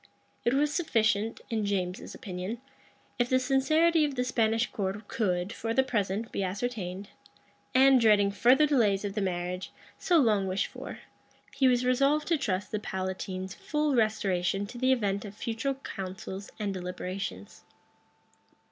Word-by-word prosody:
It 240 - +2
was 295 +2 +2
sufficient, 225 - +1
in 220 -2 0
James's 185 -3 -2
opinion, 185 +4 -5 0.6
if 245 0 +2
the 255 - +4
sincerity 310 +5 +3
of 290 -2 -1
the 250 - 0
Spanish 225 -2 +1
court 200 +1 -3
could, 185 -2 -1
for 225 0 -3
the 265 - +5
present, 215 -3 -1
be - - -2
ascertained; 195 -1 -4 0.7
and, 265 -1 +6
dreading 205 -3 +5
further 250 +9 +5
delays 215 -9 +2
of 200 - -3
the 210 - -2
marriage, 180 -1 -3 0.3
so 350 - +3
long 215 -9 +3
wished 190 +1 0
for, - - -8 0.5
he 265 - +4
was 250 -1 +3
resolved 275 +4 +2
to 335 - +3
trust 200 -7 -2
the 215 - -1
palatine's 190 -1 -4
full 300 -1 -1
restoration 200 -4 +1
to 240 +4 -9
the 260 +1 +3
event 200 -6 +1
of 205 -1 -9
future 235 +5 -2
counsels 190 -5 -7
and 205 -2 -2
deliberations. 180 - -5
215 Hz, 150 wpm, -29 LUFS, 190-255 Hz, 0.7 s, and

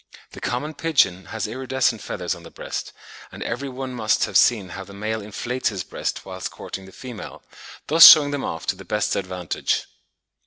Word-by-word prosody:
The - - -11
common 145 +6 -2
pigeon 135 - +1
has 110 +1 -4
iridescent 130 -1 -1
feathers 90 - -3
on 85 - -10
the 85 - -12
breast, - - -6 0.4
and - - -7
every 140 0 -4
one 130 0 -6
must 110 -3 +1
have - - -9
seen 105 -6 +4
how 95 +2 -7
the 100 +1 -13
male 110 +2 -3
inflates 120 +5 -2
his 100 -4 -4
breast - - -4
whilst 95 -1 -5
courting 95 - -8
the 95 - -13
female, 125 +1 -9 0.4
thus 165 +2 +10
shewing 145 -2 +9
them 145 -2 -3
off 80 - -4
to - - 0
the - - -11
best 105 -1 -1
advantage. 90 -2 -2
110 Hz, 190 wpm, -23 LUFS, 95-130 Hz, 0.4 s, thus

